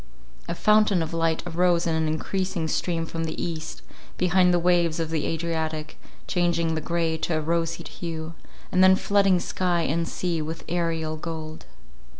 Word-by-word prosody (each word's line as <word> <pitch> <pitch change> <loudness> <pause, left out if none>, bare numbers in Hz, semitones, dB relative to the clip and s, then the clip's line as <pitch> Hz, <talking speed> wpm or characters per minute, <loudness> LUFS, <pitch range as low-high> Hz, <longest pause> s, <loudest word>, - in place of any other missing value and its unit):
A - - -2
fountain 210 -3 +4
of 160 - -6
light 165 -1 0
arose 175 0 +2
in 165 - +1
an 160 0 +1
encreasing 180 +2 -2
stream 165 +1 -1
from 165 0 -4
the 160 - -5
east, 160 -1 -5 0.3
behind 180 0 +4
the 175 - +4
waves 170 -1 +2
of 165 -1 -2
the 160 -2 0
Adriatic, 160 -1 -3 0.3
changing 170 -2 +1
the 160 - -2
grey 165 -1 -1
to 160 -1 0
a - - +1
roseate 165 +1 -1
hue, 165 -1 -5 0.4
and 185 - +4
then 185 0 +8
flooding 195 -2 +3
sky 175 -1 0
and 165 +2 0
sea 170 -3 -2
with 160 +2 -5
aerial 165 -2 -1
gold. 155 -1 -7
165 Hz, 165 wpm, -25 LUFS, 160-175 Hz, 0.4 s, then